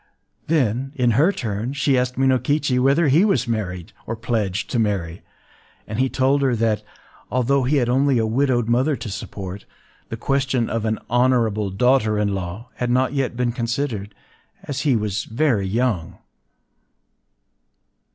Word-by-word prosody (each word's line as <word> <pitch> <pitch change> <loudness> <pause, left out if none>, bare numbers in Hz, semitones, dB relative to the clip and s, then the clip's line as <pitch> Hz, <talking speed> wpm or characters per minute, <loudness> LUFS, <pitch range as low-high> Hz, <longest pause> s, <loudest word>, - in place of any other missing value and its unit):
Then, 135 -3 0
in 125 -4 +2
her 150 - +4
turn, 115 - -3
she 140 -1 +1
asked 125 0 0
Minokichi 130 +1 +2
whether 140 +5 +3
he 150 +7 +5
was 195 -11 +1
married, 90 -7 -3
or 115 - -2
pledged 110 -4 -2
to 120 - 0
marry; 95 -6 -1 0.6
and 110 +2 -5
he 130 0 +2
told 135 +2 +2
her 130 -3 +2
that, 110 -1 +1 0.5
although 130 +3 +1
he 140 +4 +1
had 125 -4 +2
only 135 +2 +2
a 110 - +2
widowed 120 0 +1
mother 130 +6 +2
to 115 - -7
support, 95 0 -7 0.4
the 115 - -5
question 135 -1 0
of 115 -1 -1
an 110 0 0
“honorable 120 -4 +2
daughter 110 +1 +2
in 105 -1 0
law” 95 +6 -5
had 125 - -1
not 130 +2 +2
yet 135 -4 -1
been 125 -1 +1
considered, 115 -3 -3 0.5
as 140 -2 -4
he 140 -4 +2
was 105 -3 -2
very 115 -5 0
young... 105 -5 -1
120 Hz, 155 wpm, -22 LUFS, 110-135 Hz, 0.6 s, he